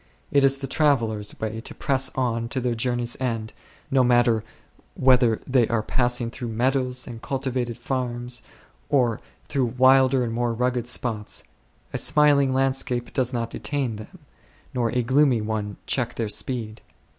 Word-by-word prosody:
It 140 Hz, -1 st, +4 dB
is 135 Hz, 0 st, +4 dB
the 135 Hz, -, -5 dB
travellers' 115 Hz, -8 st, 0 dB
way 110 Hz, 0 st, -3 dB
to -, -, -7 dB
press 135 Hz, -2 st, +1 dB
on 115 Hz, -3 st, -1 dB
to 130 Hz, -, -1 dB
their 125 Hz, -1 st, 0 dB
journey's 120 Hz, +1 st, -1 dB
end, 115 Hz, -4 st, -2 dB, 0.4 s
no 135 Hz, -1 st, +4 dB
matter 120 Hz, -3 st, +3 dB, 0.5 s
whether 125 Hz, -4 st, +4 dB
they 125 Hz, -3 st, +3 dB
are 115 Hz, -2 st, 0 dB
passing 120 Hz, 0 st, 0 dB
through 120 Hz, -, -6 dB
meadows 125 Hz, +2 st, 0 dB
and 115 Hz, -2 st, -9 dB
cultivated 130 Hz, -3 st, -2 dB
farms, 125 Hz, -1 st, -3 dB, 0.5 s
or 120 Hz, -6 st, +2 dB, 0.3 s
through 130 Hz, -5 st, -1 dB
wilder 130 Hz, 0 st, +5 dB
and 115 Hz, -1 st, -3 dB
more 120 Hz, 0 st, 0 dB
rugged 125 Hz, 0 st, 0 dB
spots; 115 Hz, -4 st, -2 dB, 0.5 s
a -, -, +1 dB
smiling 145 Hz, -3 st, +4 dB
land 135 Hz, 0 st, +2 dB
scape 120 Hz, -2 st, -2 dB
does 130 Hz, -2 st, +1 dB
not 115 Hz, -2 st, -3 dB
detain 135 Hz, -6 st, -2 dB
them, 110 Hz, -, -11 dB, 0.6 s
nor 120 Hz, -3 st, 0 dB
a 125 Hz, +1 st, 0 dB
gloomy 130 Hz, 0 st, +3 dB
one 105 Hz, -1 st, -3 dB
check 125 Hz, -3 st, -1 dB
their 115 Hz, -2 st, -2 dB
speed. 110 Hz, -1 st, -2 dB
125 Hz, 155 wpm, -24 LUFS, 115-130 Hz, 0.6 s, wilder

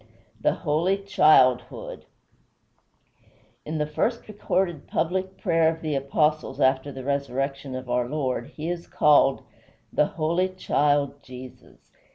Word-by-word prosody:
V 110 Hz, -, -27 dB, 0.3 s
THE -, -, +2 dB
HOLY 170 Hz, +4 st, 0 dB
CHILDHOOD 150 Hz, -10 st, +2 dB, 1.6 s
In 155 Hz, +1 st, -3 dB
the 150 Hz, -, 0 dB
first 230 Hz, +10 st, -2 dB
recorded 185 Hz, -6 st, -2 dB
public 185 Hz, +3 st, -2 dB
prayer 165 Hz, -5 st, +2 dB
of 160 Hz, -, -17 dB
the 155 Hz, -2 st, -1 dB
Apostles 150 Hz, +2 st, 0 dB
after 130 Hz, +1 st, +2 dB
the 135 Hz, -1 st, -8 dB
resurrection 135 Hz, 0 st, -2 dB
of 130 Hz, 0 st, -6 dB
our 120 Hz, 0 st, 0 dB
Lord 130 Hz, -5 st, -2 dB
he 155 Hz, +1 st, -7 dB
is 175 Hz, 0 st, -4 dB
called 145 Hz, -2 st, +4 dB, 0.5 s
"THY -, -, +3 dB
HOLY 170 Hz, +4 st, 0 dB
CHILD 145 Hz, -6 st, 0 dB
JESUS." 130 Hz, 0 st, -13 dB
150 Hz, 130 wpm, -25 LUFS, 135-170 Hz, 1.6 s, called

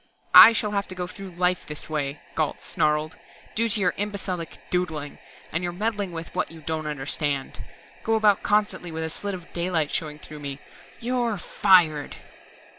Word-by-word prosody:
"I -, -, +12 dB
shall 215 Hz, -2 st, -1 dB
have 200 Hz, -1 st, -1 dB
to 185 Hz, -, -8 dB
go 180 Hz, 0 st, -3 dB
through 195 Hz, +2 st, -9 dB
life 180 Hz, 0 st, +1 dB
this 150 Hz, -1 st, -7 dB
way," 145 Hz, -2 st, -2 dB
Gault 155 Hz, -2 st, -1 dB
snarled, 150 Hz, 0 st, 0 dB, 0.4 s
"due 230 Hz, +1 st, +1 dB
to 215 Hz, -, 0 dB
your 185 Hz, -3 st, +2 dB
imbecilic 195 Hz, -5 st, -4 dB
'doodling', 160 Hz, -5 st, -2 dB, 0.3 s
your 175 Hz, +2 st, -1 dB
meddling 205 Hz, 0 st, -2 dB
with 165 Hz, -1 st, -7 dB
what -, -, -1 dB
you 165 Hz, -1 st, -12 dB
don't 155 Hz, 0 st, -3 dB
understand. 145 Hz, -1 st, -2 dB, 0.4 s
Go 225 Hz, -, +2 dB
about 210 Hz, -2 st, +4 dB
constantly 205 Hz, -4 st, +1 dB
with 160 Hz, 0 st, -3 dB
a 160 Hz, -, -3 dB
slit 200 Hz, +3 st, -4 dB
of 175 Hz, -2 st, -12 dB
daylight 170 Hz, -3 st, 0 dB
showing 150 Hz, -2 st, -2 dB
through 150 Hz, 0 st, -11 dB
me. 140 Hz, -1 st, -6 dB, 0.4 s
_You're 240 Hz, -4 st, 0 dB
fired! 160 Hz, -5 st, +3 dB
175 Hz, 170 wpm, -25 LUFS, 155-200 Hz, 0.4 s, I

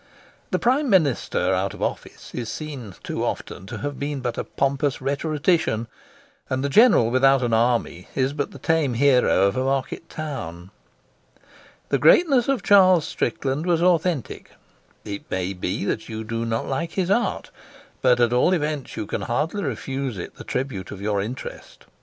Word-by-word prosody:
The -, -, +1 dB
Prime 265 Hz, +4 st, +2 dB
Minister 160 Hz, -, +2 dB
out -, -, -1 dB
of -, -, -11 dB
office -, -, -5 dB
is 115 Hz, -3 st, -4 dB
seen, 135 Hz, -, -7 dB
too -, -, -3 dB
often, 95 Hz, -, -4 dB
to -, -, -6 dB
have 145 Hz, -1 st, -4 dB
been 145 Hz, 0 st, -3 dB
but 120 Hz, -2 st, -3 dB
a -, -, -3 dB
pompous 140 Hz, 0 st, -1 dB
rhetorician, 145 Hz, -2 st, 0 dB, 0.6 s
and 130 Hz, +1 st, -1 dB
the 140 Hz, -, 0 dB
General 140 Hz, -, +5 dB
without 135 Hz, +1 st, +4 dB
an 120 Hz, -2 st, 0 dB
army 115 Hz, -6 st, +1 dB
is 135 Hz, +1 st, +1 dB
but 145 Hz, -1 st, -2 dB
the -, -, -11 dB
tame 150 Hz, -3 st, +1 dB
hero 125 Hz, -6 st, +4 dB
of 100 Hz, +1 st, +2 dB
a 130 Hz, -, 0 dB
market 135 Hz, +4 st, -2 dB
town. 95 Hz, -, -6 dB, 1.2 s
The -, -, +1 dB
greatness 275 Hz, -9 st, +5 dB
of 275 Hz, -2 st, 0 dB
Charles 185 Hz, -5 st, +6 dB
Strickland 150 Hz, 0 st, -2 dB
was 170 Hz, -1 st, +2 dB
authentic. 175 Hz, -, 0 dB, 0.6 s
It 100 Hz, -1 st, -7 dB
may 95 Hz, +1 st, -2 dB
be 95 Hz, +2 st, -3 dB
that 110 Hz, -, -2 dB
you 110 Hz, 0 st, -5 dB
do 115 Hz, +1 st, -3 dB
not 115 Hz, 0 st, -1 dB
like 165 Hz, +5 st, -2 dB
his 190 Hz, -1 st, 0 dB
art, 235 Hz, +4 st, 0 dB, 0.5 s
but 125 Hz, -1 st, +4 dB
at 120 Hz, 0 st, +3 dB
all 125 Hz, +9 st, +3 dB
events 150 Hz, -5 st, -2 dB
you 110 Hz, -, -3 dB
can -, -, -4 dB
hardly 160 Hz, -, -1 dB
refuse 135 Hz, -, -3 dB
it 85 Hz, -, -6 dB
the -, -, -11 dB
tribute 125 Hz, -7 st, -4 dB
of 100 Hz, -, -8 dB
your 100 Hz, 0 st, 0 dB
interest. 120 Hz, +5 st, -8 dB
135 Hz, 170 wpm, -23 LUFS, 115-160 Hz, 1.2 s, Charles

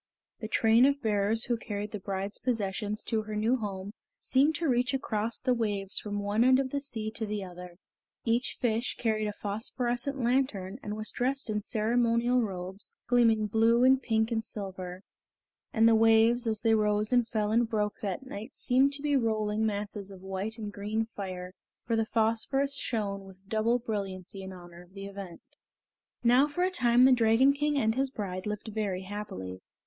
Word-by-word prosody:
The 220 Hz, -, -5 dB
train 225 Hz, +3 st, +5 dB
of 280 Hz, 0 st, +1 dB
bearers 215 Hz, +1 st, +2 dB
who 240 Hz, -1 st, 0 dB
carried 205 Hz, -2 st, -5 dB
the 210 Hz, -, -5 dB
bride's 195 Hz, +1 st, -4 dB
possessions 210 Hz, -2 st, -2 dB
to 220 Hz, -1 st, 0 dB
her 215 Hz, 0 st, -6 dB
new 225 Hz, +5 st, +2 dB
home 200 Hz, -3 st, -5 dB, 0.3 s
seemed 280 Hz, +4 st, +2 dB
to 330 Hz, +1 st, -1 dB
reach 250 Hz, 0 st, +2 dB
across 225 Hz, -3 st, -2 dB
the 255 Hz, -1 st, +1 dB
waves 205 Hz, -4 st, -1 dB
from 205 Hz, -1 st, -4 dB
one 205 Hz, +2 st, +1 dB
end 260 Hz, +1 st, +5 dB
of 265 Hz, -1 st, -1 dB
the 280 Hz, -, -1 dB
sea 220 Hz, -6 st, -4 dB
to 225 Hz, 0 st, -4 dB
the 210 Hz, -1 st, -3 dB
other. 180 Hz, -1 st, -10 dB, 0.5 s
Each 235 Hz, +2 st, 0 dB
fish 235 Hz, 0 st, 0 dB
carried 215 Hz, -2 st, 0 dB
a -, -, -1 dB
phosphorescent 240 Hz, +6 st, -2 dB
lantern 240 Hz, -5 st, 0 dB
and 210 Hz, -4 st, -5 dB
was 215 Hz, 0 st, -3 dB
dressed 260 Hz, -1 st, -1 dB
in 210 Hz, 0 st, -1 dB
ceremonial 235 Hz, +3 st, +2 dB
robes, 190 Hz, -2 st, -6 dB
gleaming 230 Hz, -3 st, +3 dB
blue 225 Hz, +3 st, +3 dB
and 260 Hz, +1 st, +5 dB
pink 220 Hz, -1 st, +1 dB
and 225 Hz, -1 st, 0 dB
silver; 190 Hz, -4 st, -6 dB, 0.7 s
and 225 Hz, 0 st, +4 dB
the 230 Hz, -, +6 dB
waves 225 Hz, +2 st, +4 dB
as 220 Hz, -1 st, -1 dB
they 225 Hz, -1 st, +3 dB
rose 210 Hz, +1 st, +2 dB
and 245 Hz, -2 st, +3 dB
fell 215 Hz, -2 st, -1 dB
and 230 Hz, +1 st, +2 dB
broke 210 Hz, -2 st, -1 dB
that 205 Hz, +6 st, -3 dB
night 225 Hz, +1 st, -8 dB
seemed 270 Hz, +2 st, +3 dB
to 280 Hz, +1 st, -1 dB
be 290 Hz, -1 st, +2 dB
rolling 220 Hz, -3 st, +1 dB
masses 205 Hz, -1 st, -3 dB
of 190 Hz, -1 st, -12 dB
white 195 Hz, +4 st, -4 dB
and 210 Hz, -2 st, -6 dB
green 215 Hz, +2 st, -2 dB
fire, 185 Hz, -4 st, -7 dB, 0.3 s
for 230 Hz, -, 0 dB
the 225 Hz, -1 st, 0 dB
phosphorus 235 Hz, +6 st, +1 dB
shone 205 Hz, -7 st, -2 dB
with 190 Hz, 0 st, -15 dB
double 220 Hz, +3 st, +2 dB
brilliancy 195 Hz, -5 st, -5 dB
in 190 Hz, 0 st, -7 dB
honor 175 Hz, -1 st, -12 dB
of 180 Hz, +1 st, -19 dB
the 195 Hz, 0 st, -7 dB
event. 195 Hz, -3 st, -9 dB, 0.8 s
Now 250 Hz, +4 st, +5 dB
for 355 Hz, +5 st, -1 dB
a 370 Hz, -, +2 dB
time 245 Hz, -7 st, +4 dB
the 260 Hz, -, +7 dB
Dragon 240 Hz, +3 st, +5 dB
King 295 Hz, +1 st, 0 dB
and 220 Hz, -4 st, +2 dB
his 270 Hz, +2 st, 0 dB
bride 190 Hz, -5 st, -5 dB
lived 210 Hz, +1 st, -4 dB
very 205 Hz, -4 st, -2 dB
happily. 95 Hz, -, -6 dB
220 Hz, 185 wpm, -29 LUFS, 205-245 Hz, 0.8 s, the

